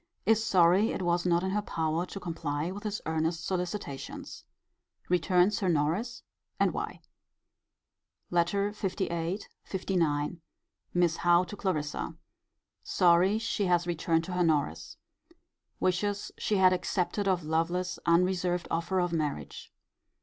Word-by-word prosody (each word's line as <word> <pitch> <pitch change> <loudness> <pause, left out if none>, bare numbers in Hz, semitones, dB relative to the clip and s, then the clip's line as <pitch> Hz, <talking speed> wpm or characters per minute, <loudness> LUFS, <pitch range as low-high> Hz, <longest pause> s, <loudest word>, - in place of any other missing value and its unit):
Is 225 0 +4
sorry 190 0 +4
it 190 - -3
was 175 0 +1
not 170 0 +2
in 190 - -1
her 210 +2 +1
power 165 -2 -1
to 195 - -7
comply 165 -2 -3
with 200 +2 -7
his 210 0 -3
earnest 160 +1 -1
solicitations. 180 -6 -4 0.6
Returns 180 +3 +3
her 190 - 0
Norris: 170 +10 0 0.4
and - - +3
why. - - -4 1.3
LETTER 175 +4 +1
LVIII. 190 -2 -2 0.3
LIX. 170 -6 0 0.6
Miss 175 -2 +3
Howe 175 0 +4
to 195 - -8
Clarissa. 155 -7 -2 0.7
Sorry 180 +4 +4
she 220 -2 -1
has 175 -1 +2
returned 165 -1 0
her 180 0 0
Norris. 150 - 0 0.8
Wishes 200 +3 0
she 215 - -1
had 185 -1 +6
accepted 180 +2 -1
of 185 -3 +1
Lovelace's 165 +4 -1
unreserved 180 0 +2
offer 170 +3 0
of 175 -1 0
marriage. 145 - -3
180 Hz, 125 wpm, -29 LUFS, 165-190 Hz, 1.3 s, had